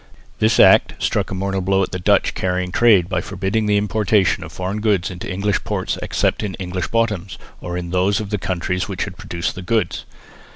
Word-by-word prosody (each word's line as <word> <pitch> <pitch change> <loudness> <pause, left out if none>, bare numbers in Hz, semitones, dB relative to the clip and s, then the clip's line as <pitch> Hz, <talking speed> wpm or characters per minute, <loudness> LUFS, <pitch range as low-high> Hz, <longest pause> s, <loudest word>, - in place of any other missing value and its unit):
This 110 +1 +3
Act - - +6
struck - - -1
a 95 - -4
mortal 95 0 -1
blow 95 +1 +2
at - - -4
the 90 - -3
Dutch 90 - +2
carrying 90 0 -2
trade 100 -4 +4
by - - -1
forbidding 105 +3 -2
the 105 0 +3
importation 105 -1 +1
of - - -9
foreign 95 +3 -4
goods 100 -6 +1
into 90 +2 -6
English 100 +1 -1
ports - - -2
except - - 0
in 100 -3 -3
English 90 -1 -4
bottoms, 105 -6 -1 0.2
or 85 0 -5
in 85 -1 -5
those 95 +3 +2
of 105 -1 -6
the 105 - -1
countries 90 0 -2
which - - -3
had - - -6
produced 85 0 -4
the 95 - -8
goods. 110 +4 -1
95 Hz, 205 wpm, -20 LUFS, 90-105 Hz, 0.2 s, Act